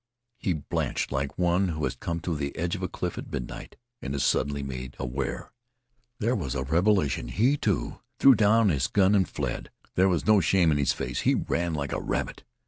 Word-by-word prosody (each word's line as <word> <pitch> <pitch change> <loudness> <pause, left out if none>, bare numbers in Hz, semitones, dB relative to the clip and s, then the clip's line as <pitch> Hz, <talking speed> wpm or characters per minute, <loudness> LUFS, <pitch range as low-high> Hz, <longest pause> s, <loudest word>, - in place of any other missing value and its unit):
He 95 -7 0
blanched 75 -3 -2
like 70 0 -2
one 90 +2 +2
who 80 -3 -3
has 65 -2 -1
come 85 +6 -4
to 85 0 -2
the 70 -2 -4
edge 85 +4 -1
of 95 - -6
a 90 - -1
cliff 90 -1 -4
at - - -9
midnight - - -6 0.3
and 70 +1 -4
is 70 - 0
suddenly 70 +1 +1
made 65 -1 -6
aware. 65 +1 -4 0.7
There 115 +4 +1
was 70 - -3
a 65 - -1
revelation. 80 - +1
He, 115 - +2
too, - - -1 0.2
threw 135 - +7
down 110 -1 +4
his 70 -6 +1
gun 100 0 +3
and 95 -3 +3
fled. - - -4 0.2
There 95 +1 +4
was 85 -4 0
no 110 -2 +5
shame 85 -1 +3
in 75 - +1
his 70 - +2
face. 60 0 -3
He - - +2
ran 85 -1 -1
like 70 -2 -3
a - - -2
rabbit. - - -3
80 Hz, 210 wpm, -27 LUFS, 70-95 Hz, 0.7 s, threw